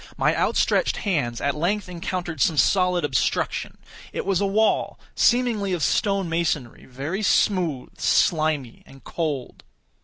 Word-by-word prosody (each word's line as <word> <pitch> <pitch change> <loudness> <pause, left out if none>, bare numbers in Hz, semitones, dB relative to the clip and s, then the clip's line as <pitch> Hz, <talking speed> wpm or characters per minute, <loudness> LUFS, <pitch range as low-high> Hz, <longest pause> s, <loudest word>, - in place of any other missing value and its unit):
My - - +2
outstretched - - +1
hands 140 - -1
at 140 - +1
length 185 +7 -1
encountered 175 -3 -4
some 160 - +2
solid 180 0 +3
obstruction. 130 -4 -1 0.3
It - - -4
was 195 -1 +1
a 200 - +2
wall, 215 +3 +1
seemingly 235 -6 +2
of 170 -4 -1
stone 195 - +1
masonry—very 155 - -3
smooth, 180 -9 0
slimy, 155 - +1
and 135 0 -16
cold. 150 -7 -4
170 Hz, 125 wpm, -23 LUFS, 145-195 Hz, 0.3 s, solid